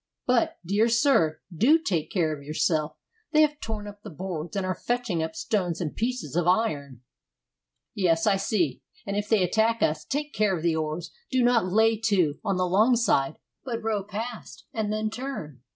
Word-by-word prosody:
But, 250 -2 +2
dear 205 +6 +2
sir, 235 - +3
do 255 - +5
take 180 - -2
care 165 -6 0
of 145 - -12
yourself. 155 +1 0 0.4
They 305 - +6
have 300 -1 0
torn 215 -2 -5
up 205 0 -10
the - - -9
boards, 170 0 -5
and 195 -2 -1
are 185 - 0
fetching 235 -3 -2
up 160 0 -3
stones 180 -2 -1
and 160 -4 -3
pieces 235 - -2
of 175 0 +1
iron." 145 - 0 0.9
"Yes, 165 -4 +2
I 200 -2 +4
see. 180 -7 0 0.2
If 205 +1 -2
they 215 -4 +4
attack 220 +5 +2
us, 155 0 +1
take 295 - -3
care 205 -3 +1
of 160 - -7
the 170 -2 +2
oars. 155 +1 -3 0.2
Do 255 -1 +2
not 240 -5 +3
lay 220 +2 +4
to 190 -9 +1
on 195 -3 0
the 185 - +1
long 215 +7 +4
side; 145 - +1 0.3
but 235 -4 -4
row 215 -3 0
past, 220 +4 -7
and 215 -2 -1
then 215 0 -1
turn. 225 - -6
200 Hz, 185 wpm, -26 LUFS, 165-225 Hz, 0.9 s, They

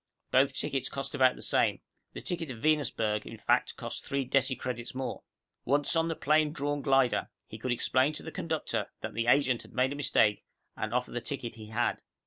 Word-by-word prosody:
Both 135 +1 +4
tickets 135 -1 -2
cost 135 0 -4
about 130 -3 +4
the - - -8
same; - - +3 0.3
the - - -6
ticket 165 -3 -3
to 130 - -4
Venusberg, 110 -6 +1
in 115 - -8
fact, - - +1
cost - - -5
three 140 -1 -1
decicredits 130 -3 0
more. 130 0 -3 0.4
Once 145 +5 +2
on 165 0 +3
the 165 - -1
plane 155 +1 +3
drawn 145 -1 -2
glider, 135 -3 +2 0.2
he 110 - -10
could 125 +3 -2
explain 130 +3 +2
to - - -6
the 160 - -6
conductor 160 -1 -2
that - - -5
the 115 +1 -1
agent 130 -2 +4
had - - -15
made 130 +1 +2
a - - -3
mistake 110 -7 +2 0.3
and 110 - -3
offer 125 +1 -1
the 120 - -3
ticket 120 -2 -4
he 110 -1 -10
had. 115 +3 0
130 Hz, 200 wpm, -30 LUFS, 120-145 Hz, 0.4 s, Both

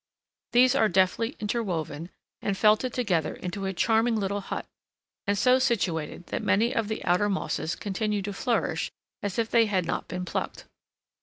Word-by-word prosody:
These 250 +1 +6
are 220 -6 +3
deftly 190 +7 +2
interwoven, 180 -7 -2 0.3
and 200 -1 -1
felted 215 +5 +4
together 185 -12 0
into 195 +2 -4
a - - 0
charming 225 +4 +2
little 200 -1 -1
hut; - - -5 0.6
and 200 0 +2
so 255 +5 +5
situated 180 - -1
that - - 0
many 230 +5 +2
of 230 -5 0
the 220 - -4
outer 180 +4 +3
mosses 190 -4 -1
continue 205 0 -2
to 205 +1 -4
flourish 235 +3 -1 0.3
as 205 -2 -3
if 230 -1 0
they 230 -1 +5
had 190 -4 +1
not - - -2
been 180 0 -4
plucked. - - -4
205 Hz, 165 wpm, -27 LUFS, 185-230 Hz, 0.6 s, These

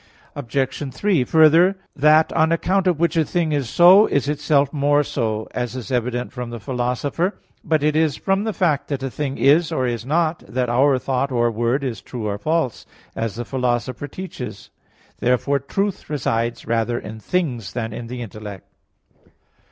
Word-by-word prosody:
Obj. 135 +1 -2
3: 170 +2 +1
Further, 165 +6 +5 0.2
"that, 155 +2 +4
on 160 +1 +3
account 185 +3 +1
of 175 -4 +1
which 170 0 +1
a 165 - +3
thing 165 0 -1
is 140 -5 -1
so, 185 +8 +7
is 140 -1 0
itself 145 -1 +1
more 145 0 +2
so," 110 -6 -2
as 125 0 -3
is 125 -4 -6
evident 125 0 -2
from 125 -2 -5
the 120 0 -6
Philosopher 125 - -1
(Poster. - - -21
i). - - -38
But 155 -2 +1
it 150 0 +2
is 155 -4 +2
from 195 - 0
the 220 - -1
fact 160 -8 0
that 140 -2 -3
a 135 - -3
thing 140 -1 -3
is 160 +4 +4
or 130 -5 0
is 120 -2 -2
not, 160 +4 0
that 125 -1 -1
our 130 +3 +3
thought 135 +1 -1
or 120 -1 +2
word 120 +5 0
is 125 -4 -4
true 120 -4 -6
or 100 -1 -2
false, 155 -3 -1 0.3
as 115 -2 -3
the 120 +1 -5
Philosopher 125 +2 -2
teaches 185 +3 -8
(Praedicam. - - -43
iii). - - -33
Therefore 140 +3 +2
truth 195 +8 -3
resides 120 -5 -1
rather 115 +1 0
in 110 -1 -7
things 125 - -2
than 115 -2 -3
in 115 - -6
the 125 0 -5
intellect. 105 -3 -9
135 Hz, 190 wpm, -21 LUFS, 120-155 Hz, 0.3 s, so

